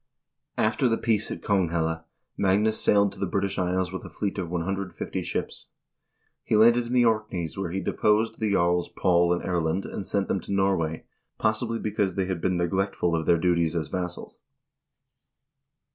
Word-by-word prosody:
After 120 +4 +2
the 115 - +1
peace 110 -2 0
at - - -6
Konghelle, 80 -4 0 0.3
Magnus 105 +3 +2
sailed 100 -1 +4
to - - -11
the 100 - -1
British 100 +2 -1
Isles 90 0 0
with 95 - -6
a - - -8
fleet 100 -1 -3
of 90 -3 -3
150 90 +1 -3
ships. - - -4 0.8
He - - 0
landed 120 +2 +5
in 120 - -4
the 125 -1 +4
Orkneys, 105 -7 -1
where 95 -2 -3
he 95 +3 -3
de - - -2
posed 110 +2 +2
the 110 -2 0
jarls 90 -2 +2
Paul 85 -1 +2
and 90 - 0
Erlend, 85 +1 -1
and 95 - -6
sent 100 -1 0
them 95 - 0
to 95 - -9
Norway, 95 -5 0 0.3
possibly, 110 +2 0
because 105 -4 -1
they 95 - 0
had 90 -3 -3
been 90 0 +1
neglectful 90 0 0
of 80 -1 -2
their 85 - +5
duties 85 -1 +1
as 80 -3 -2
vassals. 90 -1 -5
95 Hz, 175 wpm, -26 LUFS, 85-105 Hz, 0.8 s, landed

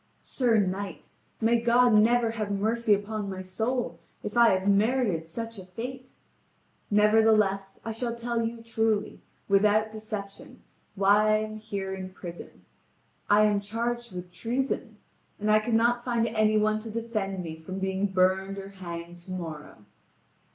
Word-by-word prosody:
"Sir 240 -4 +2
knight, 195 -2 -2 0.3
may 230 +1 +3
God 240 0 +4
never 230 +2 +4
have 215 -2 -3
mercy 215 +2 +2
upon 205 0 -4
my 190 -1 -5
soul, 220 0 -2 0.2
if 210 - -5
I 235 -1 +7
have 190 +1 +1
merited 200 -4 +2
such 230 +5 -6
a 185 - -9
fate! 250 +7 -7 0.8
Nevertheless, 210 -2 +3
I 225 - -2
shall 235 +1 -3
tell 235 0 -2
you 230 0 -4
truly, 225 -2 -1 0.3
without 210 +2 +3
deception, 215 -2 -8 0.3
why 205 +2 +4
I - - +4
am 215 0 -5
here 200 -3 -4
in 190 -1 -6
prison: 175 -2 -10 0.6
I 210 +1 +6
am 210 -1 +3
charged 235 +3 -3
with 180 0 -7
treason, 235 +2 -3 0.4
and 210 +1 +1
I 215 - +6
cannot 235 +2 +2
find 235 -2 +1
any 215 -1 +2
one 215 0 +2
to 225 +1 -8
defend 215 -4 -3
me 160 -1 -6
from 175 +4 -7
being 190 +1 0
burned 190 +1 +1
or 195 0 -7
hanged 175 -2 -8
to 185 - -9
morrow." 155 - -7
215 Hz, 150 wpm, -27 LUFS, 195-230 Hz, 0.8 s, I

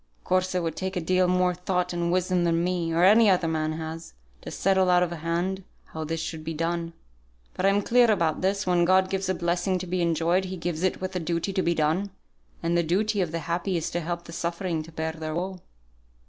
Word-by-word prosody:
Of - - -38
course 185 0 0
it 180 - +1
would 165 -2 -2
take 190 +1 -4
a - - 0
deal 185 +2 +2
more 180 0 +2
thought 180 0 -2
and 170 0 -1
wisdom 180 0 +1
than 170 0 +2
me, 175 -2 -1
or 165 +2 +2
any 215 +3 +7
other 180 -3 +3
man 155 -1 -1
has, 160 +1 -6 0.3
to - - -8
settle 190 -1 +2
out 180 0 +5
of 175 - -2
hand 170 +4 -2 0.3
how 160 - -4
this 165 +1 -3
should 160 0 -5
be 160 +1 -4
done. 165 +1 -2 0.6
But 195 - 0
I'm 200 +1 +3
clear 240 +1 +4
about 170 -7 +1
this, 195 +2 0
when 175 -1 +3
God 185 +1 +3
gives 190 -1 -1
a 185 - +1
blessing 175 +2 0
to 185 - -5
be 180 0 -1
enjoyed, 170 +2 +1
He 185 0 -5
gives 170 -1 -3
it 185 0 0
with 185 0 -4
a - - 0
duty 170 +3 -2
to 190 - +1
be 170 -1 +1
done; 160 +6 +1 0.5
and 170 +1 +1
the 170 - +4
duty 200 +5 +1
of 175 -4 -1
the 165 0 -3
happy 175 +2 -1
is 165 +1 -3
to 175 - -2
help 170 +1 -4
the 170 - -11
suffering 170 -1 -2
to 160 +2 -11
bear 160 0 -3
their 155 -1 -5
woe." 185 +2 -3
175 Hz, 240 wpm, -26 LUFS, 165-185 Hz, 0.6 s, any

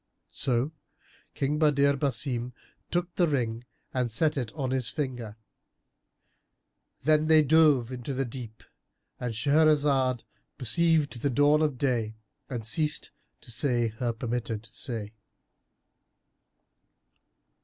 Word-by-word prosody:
So 130 +2 0 0.6
King 145 +2 -1
Badr 140 -2 +4
Basim 125 -3 -1 0.4
took 175 0 -2
the 175 - +2
ring 120 -5 -2 0.3
and 125 -2 0
set 155 +7 +2
it 125 -6 -3
on 135 -4 -3
his 130 -3 0
finger. 125 -7 -4 1.7
Then 155 +1 +3
they 155 -1 +6
dove 150 -5 +4
into 130 +2 -5
the 135 +1 0
deep——And 120 0 -9
Shahrazad 140 -2 +3 0.3
perceived 150 -1 +1
the 140 - +1
dawn 145 +3 +4
of 150 -4 0
day 120 -5 -1 0.3
and 120 -4 -5
ceased 150 +5 +1 0.3
to - - -7
say 120 -1 +1
her 115 +2 -2
permitted 115 -1 -4
say. 110 -4 -5
130 Hz, 110 wpm, -28 LUFS, 120-150 Hz, 1.7 s, they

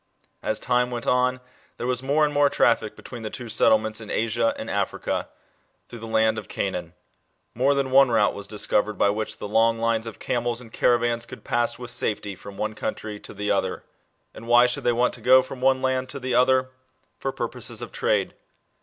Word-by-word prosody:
As 110 0 -1
time 125 0 +1
went 120 -1 -5
on, 125 0 +2 0.4
there - - -4
was 125 0 -1
more 145 +3 +2
and 150 - -2
more 145 0 +4
traffic 115 -5 +2
between 120 -2 -9
the 110 - -4
two 120 +2 -8
settlements 110 0 +2
in 110 - -10
Asia 115 +1 0
and - - -6
Africa, - - -2 0.6
through 120 - -10
the 115 - -8
land 110 0 +2
of 105 - -11
Canaan. 90 -3 -3 0.6
More 135 +4 +2
than 135 -1 -1
one 135 0 +6
route 110 -3 +3
was 100 0 -7
discovered 105 0 0
by 100 - +3
which 110 +1 -4
the - - -6
long 115 +2 +3
lines 115 0 0
of 115 - -8
camels 120 -1 -2
and 115 -3 -12
caravans 120 -1 +1
could - - -11
pass 120 0 0
with 120 0 -5
safety 105 -1 -2
from 100 +1 -11
the - - -7
one 110 0 -1
country 105 -1 -5
to - - -11
the 105 +1 -1
other. - - -1 0.5
And 115 - -11
why 120 +1 +6
should 125 - -2
they 120 - +4
want 120 +1 +1
to - - -8
go 130 +1 +6
from 130 0 -9
one 130 0 +3
land 130 0 0
to 140 - -6
the 130 -1 -3
other? 130 +1 +3 0.5
For 135 - -2
purposes - - -5
of - - -8
trade. - - 0
120 Hz, 210 wpm, -24 LUFS, 110-130 Hz, 0.6 s, one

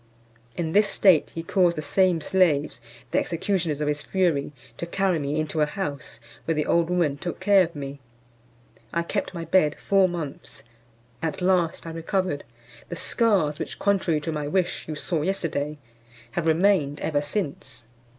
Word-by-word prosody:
In 165 -2 -2
this 210 +3 +4
state 185 -7 +4
he 165 - -4
caused 175 -1 +2
the 155 - -3
same 185 -1 +2
slaves, 155 -8 +2 0.3
the - - +3
executioners 170 -3 -1
of 150 - 0
his 150 0 -1
fury, 170 -7 0 0.3
to 170 - -4
carry 190 -1 +1
me 145 +1 -1
into 155 0 -1
a 150 - +3
house, 150 - -5 0.3
where 165 - 0
the 150 - 0
old 170 0 +2
woman 170 -6 +1
took 175 +4 -5
care 195 0 +5
of 170 -1 -6
me. 140 -1 -6 0.9
I 170 - 0
kept 195 +1 -3
my 165 -1 -4
bed 155 -3 +3
four 195 -2 +3
months; 160 -5 -6 0.6
at 160 -1 -2
last 180 -3 +1
I 165 - -5
recovered: 165 -1 -2 0.5
the 175 - -4
scars 185 -9 +2
which, - - -5
contrary 190 -6 +1
to 160 - -3
my 150 -2 -3
wish, 185 +3 -1
you 155 - -4
saw 155 +1 -1
yesterday, 150 -4 -2 0.5
have 165 +5 -2
remained 160 -3 +3
ever 145 -2 0
since. 145 - -4
165 Hz, 170 wpm, -25 LUFS, 150-185 Hz, 0.9 s, care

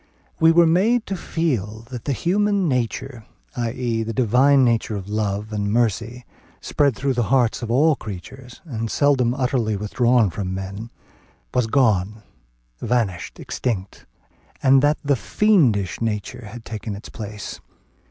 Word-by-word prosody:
We 160 0 +6
were 170 +1 +6
to - - +4
be - - +3
made 220 +7 +2
to 195 - -3
feel 120 - -2
that 125 -3 -7
the 145 - 0
human 200 - +1
nature, 125 -2 -2 0.3
i.e., 120 -1 -2
the 115 0 -3
divine 130 +3 +4
nature 115 -2 0
of 100 -1 -6
love 105 0 -2
and 100 -1 -1
mercy, 115 +2 -1 0.3
spread 140 -4 +1
through 135 +1 -1
the 120 -2 0
hearts 125 -4 +2
of 120 - -5
all 145 +6 +4
creatures, 120 +5 -10
and 115 -7 -4
seldom 130 -4 +2
utterly 125 -5 0
withdrawn 120 +1 +2
from 95 0 -4
man, 100 +4 -6 0.6
was 125 -3 +1
gone, 110 -5 +1 0.6
vanished, 110 -8 -2
extinct; 100 -6 -4 0.6
and 135 0 +6
that 145 +2 +3
the 140 -1 +3
fiendish 120 - +2
nature 110 0 -3
had 115 +1 -10
taken 110 -1 -5
its 100 - -10
place. 105 -1 -7
120 Hz, 150 wpm, -22 LUFS, 105-135 Hz, 0.6 s, We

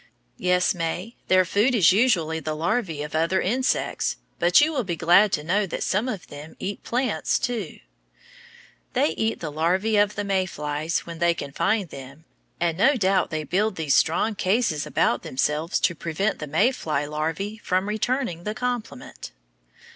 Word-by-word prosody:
Yes, 180 +1 +2
May, 175 +6 -4
their 185 0 +4
food 215 +8 +2
is 185 -7 +6
usually 185 -7 +2
the 155 0 -4
larvæ 165 -3 -1
of 150 - -10
other 165 +4 +1
insects, 255 +8 0 0.2
but 175 +1 +5
you 310 +2 +3
will 265 -4 0
be 175 -4 -3
glad 175 +6 +5
to 150 - 0
know 195 +5 +1
that - - -4
some 210 +7 0
of 205 -7 -5
them 145 +2 -11
eat 200 +1 -5
plants 245 -1 0
too. 230 -9 -3 1.2
They - - +2
eat 220 +8 -2
the 155 -3 -4
larvæ 190 +7 +2
of 205 0 0
the 205 - -2
May 190 -2 0
flies 150 +1 -2
when 170 -1 -8
they 170 0 +3
can 140 -4 -6
find 205 +6 0
them 140 +4 -11 0.3
and 170 0 0
no 275 +8 +5
doubt 190 -4 +2
they 155 -1 -3
build 190 +7 0
these 155 -5 0
strong 190 +7 +2
cases 190 -6 0
about 120 - +1
themselves 150 +6 -1
to 170 - +2
prevent 170 +6 -2
the 150 - -5
May 195 - +3
fly 150 - -2
larvæ 165 +8 -3
from 185 +2 0
returning 215 -4 -1
the 210 +2 -3
compliment. 245 - -5
180 Hz, 175 wpm, -24 LUFS, 160-215 Hz, 1.2 s, is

